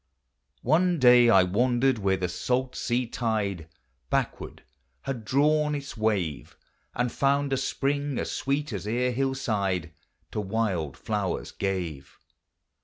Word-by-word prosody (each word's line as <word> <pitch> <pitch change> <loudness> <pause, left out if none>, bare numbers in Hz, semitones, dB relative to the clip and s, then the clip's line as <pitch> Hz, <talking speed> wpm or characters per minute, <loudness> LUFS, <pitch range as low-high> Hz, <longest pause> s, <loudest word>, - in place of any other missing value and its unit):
One 175 +6 +3
day 125 -3 +7
1 95 -4 +4
wandered 125 +2 +2
where 95 -1 +1
the 90 -1 -1
salt 125 +8 -1
sea 125 +1 0
tide 105 -8 -2 0.4
Backward - - -2 0.4
had 125 -5 -4
drawn 150 +5 +2
its 140 -1 -6
wave. 100 -9 -1 0.4
And 120 0 0
found 140 0 +1
a - - +2
spring 140 +1 -1
as - - -2
sweet 140 -1 -1
as 100 0 -5
e'er 125 +3 +1
hillside 105 -10 -1 0.4
To 105 - -2
wild 95 -8 -1
flowers - - -2
gave. 90 -8 -4
120 Hz, 125 wpm, -27 LUFS, 95-135 Hz, 0.4 s, day